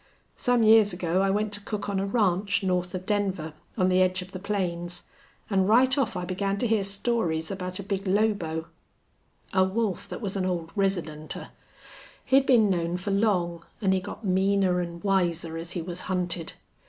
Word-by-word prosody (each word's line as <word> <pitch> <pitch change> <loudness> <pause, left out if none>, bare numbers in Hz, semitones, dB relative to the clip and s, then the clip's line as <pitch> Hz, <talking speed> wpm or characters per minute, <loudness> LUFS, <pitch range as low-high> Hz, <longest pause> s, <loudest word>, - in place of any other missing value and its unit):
Some 245 -2 +2
years 220 -2 +6
ago 175 +1 0
I 195 - +2
went 210 +1 0
to 205 - -1
cook 210 -1 -4
on 200 -1 -1
a 195 - -1
ranch 200 -1 +1
north 180 -1 0
of 185 0 -5
Denver, 190 -7 -1 0.2
on 185 -3 +3
the 185 0 +3
edge 185 0 +2
of 185 - -15
the 185 - -6
plains. 180 -3 -3 0.4
An' 190 -2 +2
right 255 +5 +5
off 275 -6 0
I 180 - -3
began 195 +2 -1
to 245 - 0
hear 220 -2 +2
stories 195 -5 -1
about 185 -1 -4
a 200 - -5
big 195 0 -3
lobo 185 -6 +1 0.9
a 190 -1 +5
wolf 195 +1 -1
that - - -5
was 200 -4 -4
an 195 - 0
old 175 -3 -2
residenter. 175 -6 -2 0.8
He'd 270 +1 +4
been 235 -5 +5
known 175 -2 0
for 185 +3 -4
long, 180 -5 +1 0.2
an' 195 -3 +2
he 190 - +3
got 210 - -8
meaner 190 -1 +2
an' 170 -1 -6
wiser 175 -4 0
as 165 +1 -5
he 175 - -3
was 175 0 -4
hunted. 180 -3 -2
190 Hz, 190 wpm, -27 LUFS, 175-205 Hz, 0.9 s, years